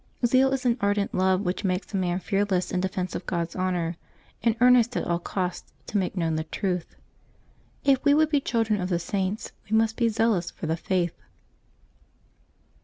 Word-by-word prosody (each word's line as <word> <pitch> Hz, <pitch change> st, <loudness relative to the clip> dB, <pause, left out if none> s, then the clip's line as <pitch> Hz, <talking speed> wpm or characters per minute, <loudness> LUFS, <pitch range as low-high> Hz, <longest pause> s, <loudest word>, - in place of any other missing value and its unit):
— -, -, -1 dB
Zeal 260 Hz, +3 st, +4 dB
is 270 Hz, -1 st, -2 dB
an 240 Hz, 0 st, +2 dB
ardent 200 Hz, 0 st, +1 dB
love 185 Hz, 0 st, +2 dB
which 185 Hz, +1 st, -2 dB
makes 185 Hz, +2 st, -2 dB
a -, -, -1 dB
man 180 Hz, -2 st, 0 dB
fearless 195 Hz, -1 st, 0 dB
in 185 Hz, -, 0 dB
defence 185 Hz, -1 st, -2 dB
of 180 Hz, -, -5 dB
Grod's 170 Hz, -1 st, -2 dB
honor, 180 Hz, -3 st, -1 dB, 0.4 s
and 230 Hz, -1 st, +2 dB
earnest 245 Hz, -1 st, +5 dB
at -, -, -1 dB
all 170 Hz, 0 st, 0 dB
costs 180 Hz, 0 st, -4 dB
to 210 Hz, -, -2 dB
make 190 Hz, +1 st, -2 dB
known 165 Hz, -2 st, 0 dB
the 155 Hz, -, -1 dB
truth. 180 Hz, 0 st, -3 dB, 0.9 s
If 275 Hz, -2 st, +3 dB
we 285 Hz, -1 st, +5 dB
would 310 Hz, 0 st, +3 dB
be 290 Hz, -2 st, +3 dB
children 225 Hz, -5 st, 0 dB
of 180 Hz, -, -2 dB
the 175 Hz, -, +1 dB
Saints, 190 Hz, +3 st, -2 dB, 0.2 s
we 220 Hz, -, +3 dB
must 225 Hz, 0 st, +1 dB
be 235 Hz, -2 st, +3 dB
zealous 220 Hz, -6 st, +1 dB
for -, -, -8 dB
the 160 Hz, +1 st, 0 dB
Faith. 175 Hz, 0 st, -1 dB
195 Hz, 190 wpm, -26 LUFS, 180-230 Hz, 0.9 s, earnest